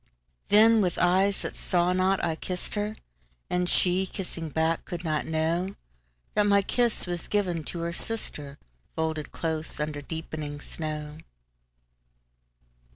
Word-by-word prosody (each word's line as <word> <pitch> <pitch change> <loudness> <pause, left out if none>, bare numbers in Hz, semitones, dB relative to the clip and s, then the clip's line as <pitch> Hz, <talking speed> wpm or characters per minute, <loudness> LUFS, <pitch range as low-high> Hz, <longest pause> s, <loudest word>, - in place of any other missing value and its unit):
Then, 220 +1 +7
with 180 -3 +1
eyes 190 +3 +3
that - - -4
saw 175 -1 +2
not, 185 +1 +2
I 165 -2 0
kissed 180 +2 -4
her; 210 +1 -1 0.6
And 180 0 +1
she, 185 +1 +3
kissing 170 -4 -5
back, 160 +2 +1
could 175 -1 -5
not 155 -3 0
knowThat 160 - -2
my 200 -1 +5
kiss 240 +3 +1
was 175 -2 -2
given 180 -6 0
to 170 - -4
her 170 0 -2
sister, 150 -9 -4 0.4
Folded 160 -2 -1
close 160 -2 -2
under 150 -1 -2
deepening 155 -1 -5
snow. 150 0 -5
170 Hz, 130 wpm, -28 LUFS, 155-190 Hz, 0.6 s, Then